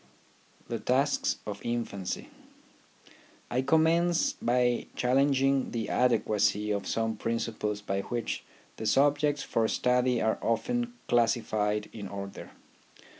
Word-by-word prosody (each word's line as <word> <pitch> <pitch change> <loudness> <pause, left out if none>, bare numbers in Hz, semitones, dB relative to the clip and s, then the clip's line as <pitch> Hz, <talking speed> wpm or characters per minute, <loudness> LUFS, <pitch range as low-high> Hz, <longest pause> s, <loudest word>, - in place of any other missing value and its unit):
THE 115 - -3
TASKS 135 +6 +1
OF 100 -1 -6
INFANCY 115 -5 -3 1.2
I 125 - +1
commence 165 +4 +3
by 120 0 +1
challenging 135 +1 +2
the 115 -2 -3
adequacy 105 -3 +2
of 100 -1 -2
some 115 -1 -1
principles 110 -2 -2
by 100 -1 -2
which 120 +2 -3 0.3
the 110 - -3
subjects 145 +3 +3
for 115 -1 +1
study 125 +1 +2
are 110 0 +1
often 240 - -1
classified 110 -3 +1
in 105 -3 -6
order. 100 0 -7
120 Hz, 110 wpm, -29 LUFS, 105-135 Hz, 1.2 s, commence